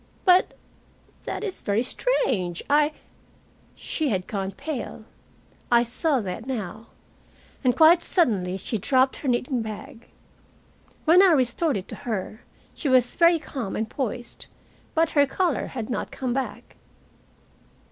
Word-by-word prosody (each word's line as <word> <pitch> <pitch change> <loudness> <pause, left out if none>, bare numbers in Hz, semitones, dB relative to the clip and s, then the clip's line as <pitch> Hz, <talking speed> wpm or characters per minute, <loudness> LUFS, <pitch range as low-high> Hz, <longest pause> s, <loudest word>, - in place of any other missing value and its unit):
"But 365 -1 +4 0.7
that - - -4
is 400 -4 -5
very 210 +3 0
strange. 215 - 0
I 295 +1 +3 0.4
" - - -33
She 310 -3 -2
had 185 -5 -1
gone 195 -2 -3
pale. 270 -4 -6 0.7
I 235 0 +6
saw 255 +3 0
that 205 +4 -6
now. 225 -3 -5 0.8
And 250 -2 +3
quite 330 +2 +7
suddenly 195 - +1
she 210 +3 -4
dropped 260 +4 +2
her 285 - -6
knitting 250 0 0
bag. 225 +3 -8 1.0
When 340 +3 +7
I 380 -3 +6
restored 270 +1 +1
it 190 - -7
to - - -5
her, 215 +1 -4 0.3
she 290 - -3
was 255 -2 +3
very 335 0 +5
calm 265 -9 -5
and 220 - -2
poised, 240 -1 -5 0.5
but 325 0 +2
her 285 -2 +4
color 345 +2 0
had 235 -5 -5
not - - -3
come 255 -2 -3
back. 265 0 -5
255 Hz, 140 wpm, -25 LUFS, 220-305 Hz, 1.0 s, quite